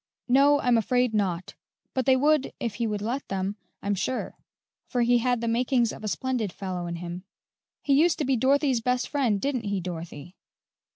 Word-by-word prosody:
"No, 280 +3 +5
I'm 245 -2 +3
afraid 245 +1 +1
not; 185 -4 -1 0.4
but 260 -1 -1
they 265 - +6
would 295 +1 +2
if 235 -3 -2
he 230 - +1
would 210 -1 -3
let 250 +5 -3
them, 195 +1 -2 0.3
I'm 205 - 0
sure, 215 +6 -2 0.5
for 245 -1 0
he 240 0 +4
had 245 -1 0
the 235 - -2
makings 240 0 +2
of - - -10
a - - -3
splendid 245 -3 -1
fellow 180 -2 -5
in 170 - -4
him." 175 +1 -6 0.6
"He 280 - +2
used 320 +4 +4
to 300 - -1
be 265 0 +2
Dorothy's 265 0 +2
best 250 +1 0
friend, 250 -9 +1
didn't 255 -2 -2
he, 200 -1 -1
Dorothy?" 170 -1 -7
235 Hz, 190 wpm, -26 LUFS, 200-260 Hz, 0.6 s, they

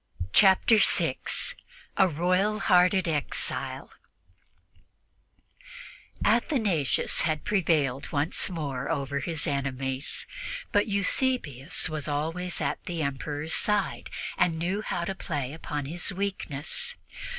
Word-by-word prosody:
Chapter 200 +3 +6
6 - - +2 0.4
A 190 - +5
ROYAL 185 +6 +1
HEARTED 180 +1 +4
EXILE 150 -5 -2 2.3
ATHANASIUS 215 - +2
had 155 -2 -1
prevailed 155 -9 +1
once 150 +5 +1
more 140 -7 -4
over 140 -3 -1
his 160 +2 -2
enemies, 135 -1 -2 0.5
but 205 +2 +3
Eusebius 200 - +1
was 155 -2 -4
always 165 +5 -2
at - - -2
the 170 -4 -2
Emperor's 145 +3 -3
side 210 -2 0 0.3
and 175 -2 +2
knew 180 +5 -1
how 175 -5 -3
to 195 - -2
play 145 -8 -4
upon 150 -3 -4
his 175 +7 -1
weakness. 190 - -1
165 Hz, 105 wpm, -27 LUFS, 145-190 Hz, 2.3 s, Chapter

